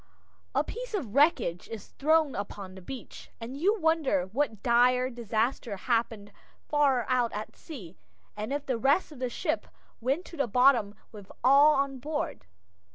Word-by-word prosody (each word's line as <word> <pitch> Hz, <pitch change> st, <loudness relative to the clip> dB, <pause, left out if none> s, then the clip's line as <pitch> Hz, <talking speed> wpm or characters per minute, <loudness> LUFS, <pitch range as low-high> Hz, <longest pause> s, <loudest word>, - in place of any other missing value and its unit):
A -, -, +3 dB
piece -, -, -6 dB
of 250 Hz, -, -4 dB
wreckage 260 Hz, -, +2 dB
is 225 Hz, -3 st, -8 dB
thrown 310 Hz, -1 st, +2 dB
upon 200 Hz, -1 st, -6 dB
the 190 Hz, -, -11 dB
beach, 255 Hz, +6 st, -9 dB
and 235 Hz, +3 st, -7 dB
you 400 Hz, +9 st, +1 dB
wonder 315 Hz, -, +2 dB
what 245 Hz, -6 st, -1 dB
dire 250 Hz, +1 st, +3 dB
disaster 230 Hz, -1 st, -2 dB
happened 225 Hz, -1 st, -1 dB, 0.4 s
far 280 Hz, -5 st, +2 dB
out 250 Hz, -2 st, +1 dB
at 210 Hz, +1 st, -6 dB
sea, 195 Hz, -, -10 dB, 0.4 s
and 215 Hz, +4 st, -5 dB
if 290 Hz, 0 st, -2 dB
the 255 Hz, -4 st, -1 dB
rest 280 Hz, +8 st, +2 dB
of 290 Hz, -, -11 dB
the 255 Hz, -1 st, -1 dB
ship -, -, -2 dB, 0.3 s
went 270 Hz, +9 st, -1 dB
to 335 Hz, -, -11 dB
the 275 Hz, -, +1 dB
bottom 235 Hz, -3 st, +4 dB, 0.2 s
with 205 Hz, -3 st, -12 dB
all 285 Hz, +3 st, +7 dB
on 275 Hz, -1 st, -1 dB
board. 295 Hz, -, -4 dB
255 Hz, 160 wpm, -28 LUFS, 220-290 Hz, 0.4 s, all